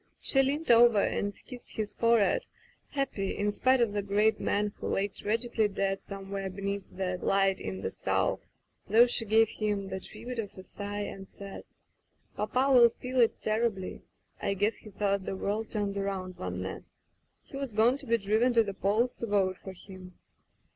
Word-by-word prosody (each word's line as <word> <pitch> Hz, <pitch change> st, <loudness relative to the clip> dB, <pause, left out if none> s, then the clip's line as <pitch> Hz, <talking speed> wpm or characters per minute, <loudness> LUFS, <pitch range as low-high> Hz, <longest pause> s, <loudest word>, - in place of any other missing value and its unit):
She 270 Hz, -, +4 dB
leaned 285 Hz, +2 st, +1 dB
over 235 Hz, -2 st, +7 dB
and 205 Hz, -, 0 dB
kissed 250 Hz, -2 st, -11 dB
his 215 Hz, -2 st, -3 dB
forehead, 230 Hz, -, +3 dB, 0.4 s
happy 255 Hz, -9 st, -2 dB
in 205 Hz, 0 st, +1 dB
spite 255 Hz, +4 st, +3 dB
of 225 Hz, -3 st, +2 dB
the 205 Hz, -, 0 dB
great 205 Hz, +2 st, +2 dB
man 205 Hz, 0 st, 0 dB
who -, -, -4 dB
lay 195 Hz, +1 st, +1 dB
tragically 225 Hz, +2 st, 0 dB
dead 195 Hz, -1 st, -1 dB
somewhere 195 Hz, -1 st, -5 dB
beneath 200 Hz, +1 st, -3 dB
that 180 Hz, -1 st, -3 dB
light 195 Hz, -1 st, +2 dB
in 95 Hz, 0 st, -5 dB
the 95 Hz, -, -3 dB
south, -, -, 0 dB, 0.5 s
though 225 Hz, +4 st, +7 dB
she 240 Hz, -1 st, -2 dB
gave 220 Hz, +1 st, +4 dB
him 205 Hz, -2 st, -2 dB
the 190 Hz, -, -4 dB
tribute 245 Hz, +5 st, -7 dB
of 205 Hz, -3 st, -5 dB
a 185 Hz, -, -8 dB
sigh, 205 Hz, +1 st, -5 dB
and 195 Hz, -1 st, -6 dB
said: 200 Hz, -1 st, -9 dB, 0.7 s
"Papa 255 Hz, +6 st, +1 dB
will 240 Hz, -2 st, +8 dB
feel 250 Hz, +2 st, -4 dB
it 230 Hz, -2 st, +3 dB
terribly. 215 Hz, -3 st, -1 dB, 0.4 s
I 200 Hz, -, 0 dB
guess 205 Hz, +3 st, +1 dB
he 215 Hz, -, -12 dB
thought 200 Hz, -1 st, -1 dB
the -, -, -3 dB
world 210 Hz, +3 st, -2 dB
turned 205 Hz, -2 st, -2 dB
around 195 Hz, -2 st, -3 dB
Van 90 Hz, 0 st, -4 dB
Ness. 95 Hz, -, -8 dB, 0.5 s
He -, -, -13 dB
was 275 Hz, -3 st, -4 dB
going 230 Hz, +5 st, +3 dB
to 280 Hz, -, -8 dB
be 230 Hz, 0 st, +3 dB
driven 220 Hz, +4 st, +2 dB
to 230 Hz, -1 st, +5 dB
the 200 Hz, -2 st, -4 dB
polls 215 Hz, +6 st, +1 dB
to 235 Hz, -, -5 dB
vote 190 Hz, -3 st, +1 dB
for 190 Hz, -, -8 dB
him." 185 Hz, -1 st, -12 dB
205 Hz, 185 wpm, -29 LUFS, 195-230 Hz, 0.7 s, will